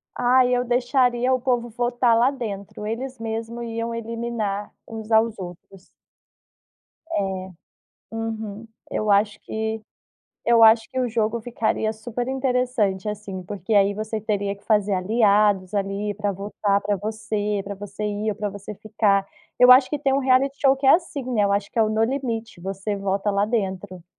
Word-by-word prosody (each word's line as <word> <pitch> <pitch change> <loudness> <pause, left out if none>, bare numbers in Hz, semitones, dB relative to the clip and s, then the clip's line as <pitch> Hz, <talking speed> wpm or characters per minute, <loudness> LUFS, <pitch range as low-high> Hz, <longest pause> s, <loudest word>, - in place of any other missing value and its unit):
Ah, 250 +1 +4
eu 245 0 +2
deixaria 245 0 +2
o 255 - +2
povo 240 -2 0
votar 240 0 +2
lá 240 +3 +4
dentro. 210 -6 -6
Eles 255 +4 -4
mesmo 225 +1 -4
iam 230 0 -3
eliminar 230 -3 -3
uns 220 -1 -8
aos 220 0 +3
outros. 180 +1 -10 1.3
É, 190 - -2 0.7
uhum. 225 -1 -5 0.2
Eu 215 -1 -1
acho 205 +1 +2
que 220 0 -3 0.6
eu 235 -1 +5
acho 225 0 +6
que 260 - -3
o 250 - +1
jogo 225 0 0
ficaria 220 -1 -1
superinteressante, 245 -3 -1
assim, 205 -3 -5
porque 205 +3 -3
aí 200 0 +4
você 215 +1 -4
teria 205 -2 -2
que 200 - -23
fazer 210 -2 +2
aliados 200 -1 +3
ali 200 +1 -2
pra 205 -1 -1
votar 200 +1 -1
pra 205 0 0
você, 210 0 -2
pra 200 +1 -6
você 200 +1 -7
ir 210 +1 -1
ou - - -5
pra 210 0 -3
você 200 +1 -8
ficar. 205 -1 +1 0.4
Eu 250 0 +8
acho 255 +1 +8
que 295 - -3
tem 275 -2 +1
um - - +3
reality 270 +1 +2
show 270 -2 +4
que 270 0 -1
é - - +8
assim, 335 -5 -5
né? 215 -4 +2
Eu 200 - +2
acho 200 0 0
que - - -9
é 225 - +5
o 215 - 0
No 220 +1 +1
Limite. 230 -5 -3
Você 195 +2 -3
volta 200 +1 -1
lá 200 +1 +2
pra 220 - -9
dentro. 190 -4 -3
220 Hz, 175 wpm, -23 LUFS, 200-240 Hz, 1.3 s, Eu